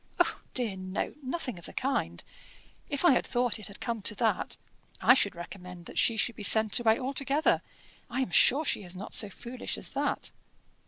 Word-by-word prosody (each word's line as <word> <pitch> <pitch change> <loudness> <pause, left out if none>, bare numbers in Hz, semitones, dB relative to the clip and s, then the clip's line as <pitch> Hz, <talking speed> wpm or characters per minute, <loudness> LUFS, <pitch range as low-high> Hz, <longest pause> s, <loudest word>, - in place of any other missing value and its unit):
"Oh - - +1
dear, 235 -6 +1
no 185 0 -4
nothing 260 - -4
of 170 - -7
the - - -11
kind. 275 +1 -1 0.7
If 285 +4 -1
I 270 -8 +6
thought 245 -2 0
it 215 - -7
had 200 - -12
come 230 -3 -3
to 210 - +3
that, 225 +1 0 0.4
I - - +7
should 205 -8 +1
recommend 180 0 -9
that - - -4
she 230 - +3
should 235 +1 +1
be - - -9
sent 220 +1 +5
away 225 -1 +3
altogether. 275 +3 +1 0.5
I 260 - -1
am 225 - -2
sure 280 - +6
she - - +1
is 180 0 -9
not 195 - -7
so 210 - +2
foolish 240 +5 -6
as - - -5
that." - - -1
230 Hz, 195 wpm, -29 LUFS, 200-260 Hz, 0.7 s, I